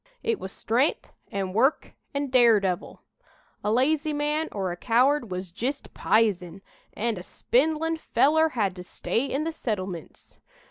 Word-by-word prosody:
It 455 Hz, -3 st, 0 dB
was 190 Hz, -, -6 dB
stren'th 245 Hz, +9 st, 0 dB, 0.2 s
an' 190 Hz, -2 st, -3 dB
work 260 Hz, +8 st, +2 dB, 0.2 s
an' 280 Hz, -2 st, -2 dB
daredevil. 215 Hz, -8 st, +3 dB, 0.6 s
A 210 Hz, -, +1 dB
lazy 300 Hz, +6 st, +2 dB
man 300 Hz, +2 st, -1 dB
or 190 Hz, -3 st, -2 dB
a -, -, -4 dB
coward 250 Hz, +5 st, +2 dB
was 180 Hz, -1 st, -5 dB
jist 265 Hz, +10 st, -4 dB
pizen, 195 Hz, -4 st, +1 dB, 0.3 s
an' 225 Hz, -1 st, -1 dB
a -, -, -5 dB
spindlin' 315 Hz, -, 0 dB
feller 315 Hz, +3 st, +3 dB
had 205 Hz, -9 st, -1 dB
to 180 Hz, -, -7 dB
stay 230 Hz, +7 st, -2 dB
in 275 Hz, +2 st, -1 dB
the 325 Hz, +1 st, -3 dB
settlemints. 190 Hz, -, -5 dB
235 Hz, 145 wpm, -26 LUFS, 195-295 Hz, 0.6 s, daredevil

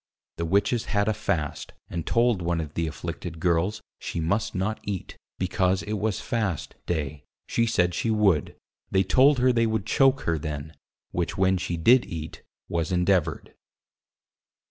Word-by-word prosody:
The 85 Hz, -, -1 dB
Witches 100 Hz, +6 st, +1 dB
had 100 Hz, 0 st, +1 dB
a 110 Hz, -, +3 dB
Fast, 100 Hz, -8 st, -2 dB
and 85 Hz, -2 st, -5 dB
told 115 Hz, -4 st, +2 dB
one 85 Hz, 0 st, 0 dB
of 75 Hz, -2 st, -5 dB
the 85 Hz, -1 st, -1 dB
Afflicted 85 Hz, +1 st, -6 dB
Girles, 90 Hz, +5 st, +1 dB, 0.2 s
she -, -, -4 dB
must 100 Hz, +7 st, 0 dB
not 95 Hz, +4 st, -1 dB
Eat, 100 Hz, -3 st, -5 dB, 0.2 s
because 95 Hz, +1 st, +1 dB
it 105 Hz, -, -4 dB
was 105 Hz, -1 st, -1 dB
Fast 95 Hz, -11 st, -2 dB
Day, 75 Hz, -3 st, -2 dB, 0.2 s
she 115 Hz, -, +1 dB
said, 90 Hz, -6 st, +2 dB
she 115 Hz, -, -1 dB
would: 100 Hz, -9 st, +2 dB, 0.3 s
they 95 Hz, 0 st, +3 dB
told 130 Hz, +10 st, +5 dB
her 125 Hz, 0 st, +4 dB
they 115 Hz, -1 st, +3 dB
would 110 Hz, -2 st, -1 dB
Choake 135 Hz, +4 st, +3 dB
her 80 Hz, -1 st, 0 dB
then; 75 Hz, +1 st, -5 dB, 0.4 s
which 85 Hz, -1 st, -2 dB
when 95 Hz, 0 st, +3 dB
she 90 Hz, -2 st, -2 dB
did 120 Hz, +10 st, +5 dB
eat, 80 Hz, -1 st, -6 dB, 0.3 s
was 85 Hz, 0 st, -1 dB
endeavoured. 90 Hz, -3 st, +1 dB
95 Hz, 165 wpm, -26 LUFS, 85-110 Hz, 0.4 s, told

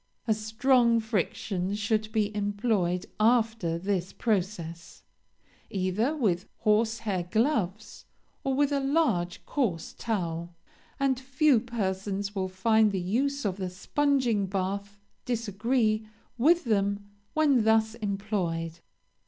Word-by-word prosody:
A 220 Hz, -, +4 dB
strong 230 Hz, +2 st, +3 dB
friction 200 Hz, -3 st, -2 dB
should 215 Hz, +1 st, 0 dB
be 215 Hz, -1 st, 0 dB
employed 205 Hz, -3 st, 0 dB
after 225 Hz, -6 st, +2 dB
this 185 Hz, 0 st, -2 dB
process, 180 Hz, -6 st, -3 dB, 0.7 s
either 205 Hz, +10 st, 0 dB
with 195 Hz, -, 0 dB
horsehair 215 Hz, -4 st, +1 dB
gloves 215 Hz, -, -1 dB, 0.4 s
or 270 Hz, -1 st, 0 dB
with 285 Hz, +1 st, +2 dB
a 280 Hz, -, +2 dB
large 270 Hz, -, 0 dB
coarse 195 Hz, -, -1 dB
towel, 170 Hz, -6 st, -3 dB, 0.4 s
and 270 Hz, -2 st, +2 dB
few 270 Hz, 0 st, +3 dB
persons 200 Hz, -3 st, -3 dB
will 190 Hz, -2 st, -2 dB
find 215 Hz, +3 st, +3 dB
the 195 Hz, -, -1 dB
use 265 Hz, +10 st, -1 dB
of 190 Hz, -2 st, -1 dB
the 185 Hz, -2 st, -3 dB
sponging 240 Hz, +1 st, +1 dB
bath 200 Hz, +1 st, -3 dB, 0.3 s
disagree 220 Hz, -1 st, 0 dB, 0.3 s
with 325 Hz, +8 st, +4 dB
them 200 Hz, -2 st, 0 dB, 0.2 s
when 285 Hz, -7 st, +4 dB
thus 220 Hz, 0 st, +3 dB
employed. 195 Hz, -6 st, -2 dB
215 Hz, 110 wpm, -28 LUFS, 190-235 Hz, 0.7 s, A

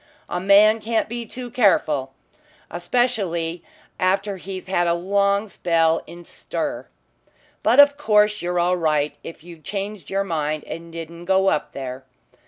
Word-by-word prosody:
A 175 Hz, -, -2 dB
man 205 Hz, +3 st, +5 dB
can't 225 Hz, +1 st, -1 dB
be 235 Hz, 0 st, -6 dB
too 245 Hz, +1 st, -8 dB
careful 155 Hz, -, +2 dB, 0.6 s
especially 175 Hz, -4 st, -1 dB, 0.4 s
after 195 Hz, +2 st, 0 dB
he's 185 Hz, 0 st, -7 dB
had 175 Hz, -2 st, 0 dB
a 170 Hz, -, +2 dB
long 200 Hz, +3 st, +1 dB
spell 165 Hz, -4 st, +1 dB
in 175 Hz, 0 st, -11 dB
'stir,' -, -, -5 dB, 0.7 s
But 235 Hz, +5 st, +3 dB
of 285 Hz, 0 st, +7 dB
course 210 Hz, -6 st, +3 dB
you're 175 Hz, 0 st, -2 dB
all 180 Hz, +1 st, +2 dB
right 150 Hz, -3 st, 0 dB
if 165 Hz, -1 st, -10 dB
you 170 Hz, -1 st, -12 dB
changed 200 Hz, 0 st, -6 dB
your 195 Hz, 0 st, 0 dB
mind 155 Hz, -4 st, -2 dB
and 165 Hz, 0 st, -8 dB
didn't 170 Hz, +1 st, -8 dB
go 190 Hz, +1 st, +3 dB
up 150 Hz, -, -2 dB
there. 130 Hz, -1 st, -6 dB
185 Hz, 150 wpm, -22 LUFS, 165-210 Hz, 0.7 s, of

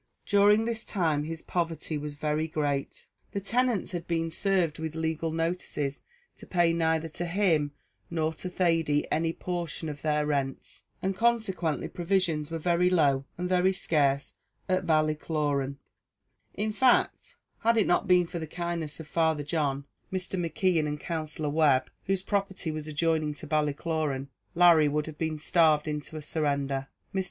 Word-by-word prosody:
During 205 Hz, +2 st, +5 dB
this 230 Hz, -1 st, -2 dB
time 160 Hz, -7 st, 0 dB
his 160 Hz, 0 st, -5 dB
poverty 165 Hz, -2 st, -2 dB
was 150 Hz, 0 st, -4 dB
very 150 Hz, +1 st, -1 dB
great; 145 Hz, -3 st, -2 dB, 0.3 s
the 200 Hz, -, -1 dB
tenants 235 Hz, +1 st, 0 dB
had 175 Hz, -2 st, -5 dB
been 165 Hz, -1 st, -1 dB
served 175 Hz, -4 st, +1 dB
with 160 Hz, 0 st, -4 dB
legal 160 Hz, 0 st, -1 dB
notices 165 Hz, -4 st, -2 dB, 0.4 s
to -, -, -11 dB
pay 175 Hz, -2 st, +3 dB
neither 160 Hz, -1 st, +1 dB
to 175 Hz, +3 st, -4 dB
him 165 Hz, -6 st, +2 dB, 0.4 s
nor 160 Hz, -1 st, 0 dB
to 180 Hz, +3 st, -6 dB
Thady 165 Hz, -5 st, +1 dB
any 165 Hz, +1 st, +1 dB
portion 170 Hz, -2 st, -4 dB
of 145 Hz, -1 st, -7 dB
their 150 Hz, -1 st, +1 dB
rents, 140 Hz, -3 st, -3 dB, 0.2 s
and 190 Hz, 0 st, 0 dB
consequently 195 Hz, -8 st, +1 dB
provisions 175 Hz, -4 st, 0 dB
were 165 Hz, -, -3 dB
very 175 Hz, +2 st, +2 dB
low 140 Hz, -6 st, +3 dB
and 180 Hz, +1 st, -2 dB
very 185 Hz, +1 st, +3 dB
scarce 140 Hz, -6 st, +1 dB, 0.3 s
at 185 Hz, -1 st, 0 dB
Ballycloran; 150 Hz, -3 st, +1 dB, 0.8 s
in 215 Hz, +2 st, -1 dB
fact, 250 Hz, +2 st, +2 dB, 0.2 s
had 230 Hz, 0 st, +3 dB
it 215 Hz, -, +4 dB
not 175 Hz, -, +2 dB
been 180 Hz, -1 st, +5 dB
for 170 Hz, +1 st, -5 dB
the 160 Hz, -, -5 dB
kindness 170 Hz, -2 st, -3 dB
of 160 Hz, -, -7 dB
Father 160 Hz, -3 st, +1 dB
John, 140 Hz, -3 st, -1 dB, 0.3 s
Mr. 185 Hz, 0 st, -3 dB
McKeon, 175 Hz, -2 st, +1 dB
and 150 Hz, 0 st, -3 dB
Counsellor 155 Hz, -2 st, -3 dB
Webb, 145 Hz, -4 st, +3 dB
whose 195 Hz, -1 st, 0 dB
property 195 Hz, -4 st, -1 dB
was 155 Hz, 0 st, -5 dB
adjoining 155 Hz, -1 st, 0 dB
to -, -, -8 dB
Ballycloran, 150 Hz, -2 st, -1 dB, 0.3 s
Larry 170 Hz, -3 st, +6 dB
would 150 Hz, +1 st, 0 dB
have 155 Hz, -1 st, -9 dB
been 160 Hz, -1 st, -1 dB
starved 155 Hz, -1 st, +3 dB
into 150 Hz, +1 st, -4 dB
a 155 Hz, -, -6 dB
surrender. 140 Hz, -3 st, -1 dB, 0.3 s
Mr. 190 Hz, -, 0 dB
160 Hz, 160 wpm, -28 LUFS, 150-180 Hz, 0.8 s, Larry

